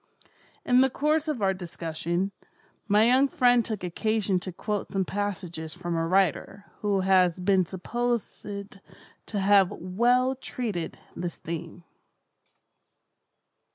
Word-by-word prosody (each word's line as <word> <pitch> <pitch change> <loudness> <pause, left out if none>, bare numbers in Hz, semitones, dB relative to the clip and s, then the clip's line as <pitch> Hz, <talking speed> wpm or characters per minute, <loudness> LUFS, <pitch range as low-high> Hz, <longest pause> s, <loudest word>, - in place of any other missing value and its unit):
In 250 +1 +5
the 265 - +4
course 300 +4 0
of 275 -9 -2
our 190 0 +3
discussion, 175 +1 -3 0.6
my 210 +2 +5
young 260 +3 +5
friend 245 -6 +4
took 215 -5 -5
occasion 200 +1 0
to 185 - -6
quote 205 +3 -4
some 195 -1 0
passages 180 -5 -4
from 175 -1 -3
a 165 0 0
writer 195 +2 +1
who 200 -2 +1
has 185 -2 +3
been 185 -1 +2
supposed 235 +5 -2
to 200 +1 -9
have 195 -1 +5
well 240 +8 +1
treated 220 -9 -4 0.2
this 175 -1 -4
theme. 170 +1 -7
195 Hz, 120 wpm, -27 LUFS, 180-235 Hz, 0.6 s, In